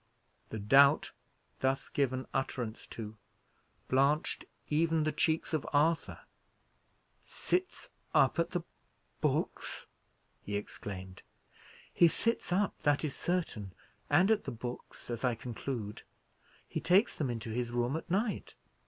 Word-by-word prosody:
The 110 - -4
doubt 140 +8 +5 0.5
thus 135 0 +1
given 130 -2 0
utterance 125 -4 -2
to, 110 -1 -7 0.7
blanched 140 +4 +2 0.2
even 160 +1 +2
the 155 - +1
cheeks 160 +2 0
of 155 - +1
Arthur. 155 +3 +2 1.0
"Sits 365 0 -2 0.2
up - - +4
at 170 0 +2
the 175 -2 -2 0.6
books!" - - -1 0.6
he 100 0 -2
exclaimed. 95 -2 -7 0.7
"He 170 - +7
sits 230 +4 0
up, 195 +2 +1
that 145 +1 +2
is 145 - -3
certain; 125 - -2 0.4
and 190 +5 +5
at 220 - +2
the - - -3
books, 120 +1 -7
as 115 -1 -4
I 125 -2 +2
conclude. 115 -2 -5 0.7
He - - -3
takes 185 +7 +4
them 145 -5 -1
into 115 -1 -4
his 120 +1 -1
room 120 +3 0
at 165 - -5
night. 205 +3 -1
135 Hz, 125 wpm, -32 LUFS, 120-165 Hz, 1.0 s, He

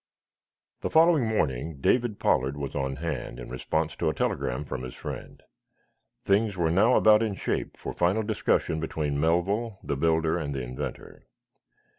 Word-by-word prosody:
The - - -3
following 160 -6 +5
morning 75 - -1
David 115 - +2
Pollard 65 +3 +1
was 70 -1 -4
on 65 -1 -2
hand, 70 -5 -4
in - - -8
response 80 +5 -2
to - - +1
a - - -3
telegram 65 +4 -1
from 65 - -5
his 65 -1 -7
friend. - - -8 0.8
Things 100 0 +2
were 85 -2 +1
now 110 +8 +4
about 110 0 +6
in 110 -3 -1
shape - - -3
for - - -6
final 90 +6 +1
discussion 105 -6 0
between 75 -2 -2
Melville, 95 +7 +1
the - - -2
builder 80 +3 +1
and 70 -3 -3
the 65 - -2
inventor. 60 +1 -7
80 Hz, 160 wpm, -27 LUFS, 70-105 Hz, 0.8 s, about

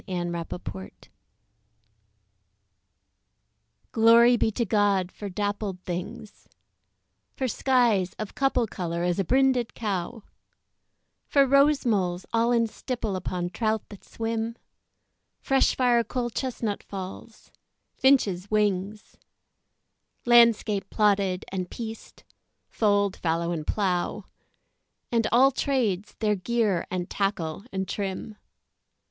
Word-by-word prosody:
13 175 -2 -3
Pied 170 -1 -5
Beauty 95 0 -9 2.8
GLORY 230 +2 +6
be 225 - +1
to 230 +2 -1
God 200 -3 +1
for 205 - -7
dappled 205 -1 -3
things 180 +4 -7 0.9
For 260 - -1
skies 235 -8 +2
of 215 -2 -6
couple 270 -3 +1
colour 170 -4 -4
as 175 +1 0
a - - +2
brinded 260 +2 +2
cow; 210 0 -3 1.0
For 280 -1 +4
rose 275 +2 +4
moles 185 -5 0
all 230 +1 +2
in 235 -1 +3
stipple 220 -2 -4
upon 180 -1 -3
trout 220 0 -1
that 205 - -12
swim: 225 0 -3 0.8
Fresh 270 0 +2
firecoal 240 -1 +1
chestnut 235 -5 -3
falls; 195 +3 -9 0.4
finches' 205 -9 +2
wings; 210 -1 -1 1.1
Landscape 230 -4 +4
plotted 200 -3 +1
and 185 -2 -3
pieced 225 -1 -8 0.4
fold, 205 -2 +1
fallow, 170 0 -1
and 155 -3 -4
plough; 185 -4 -1 0.9
And 230 -2 +2
àll 260 +4 +5
tràdes, 220 -9 -1
their 210 -2 +1
gear 210 -2 0
and 180 -1 -3
tackle 195 -2 -2
and 190 0 -3
trim. 200 +2 -4
210 Hz, 105 wpm, -26 LUFS, 185-235 Hz, 2.8 s, GLORY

